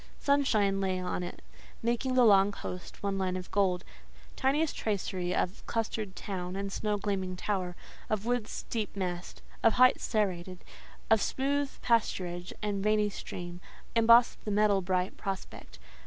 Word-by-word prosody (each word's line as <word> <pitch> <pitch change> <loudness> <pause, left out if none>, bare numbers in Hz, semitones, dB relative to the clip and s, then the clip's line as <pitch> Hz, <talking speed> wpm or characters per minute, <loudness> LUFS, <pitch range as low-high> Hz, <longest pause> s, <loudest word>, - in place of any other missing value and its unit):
Sunshine 215 -9 +2
lay 185 -1 0
on 180 0 -2
it, 175 - -7 0.4
making 240 +2 0
the 250 -1 +6
long 200 -2 +6
coast 180 -2 -8
one 200 -1 0
line 185 -1 0
of 180 - -8
gold; 185 -2 +2 0.5
tiniest 290 +4 +1
tracery 190 -4 -2
of 180 +2 -1
clustered 215 -3 -2
town 180 -2 -4
and 195 0 -3
snow 210 -1 0
gleaming 190 -2 -2
tower, 180 -2 -2 0.3
of 215 -1 -1
woods 245 -2 -2
deep 220 -4 -2
massed, 180 -2 -4 0.2
of 225 - +5
heights 255 0 +5
serrated, 185 -4 -1 0.5
of 220 -2 +6
smooth 280 +1 0
pasturage 180 -6 0
and 200 -2 -1
veiny 210 -1 +2
stream, 175 -2 -7 0.3
embossed 230 +1 +5
the - - -4
metal 205 -1 +3
bright 185 0 -1
prospect. 190 - -6
200 Hz, 145 wpm, -30 LUFS, 185-225 Hz, 0.5 s, the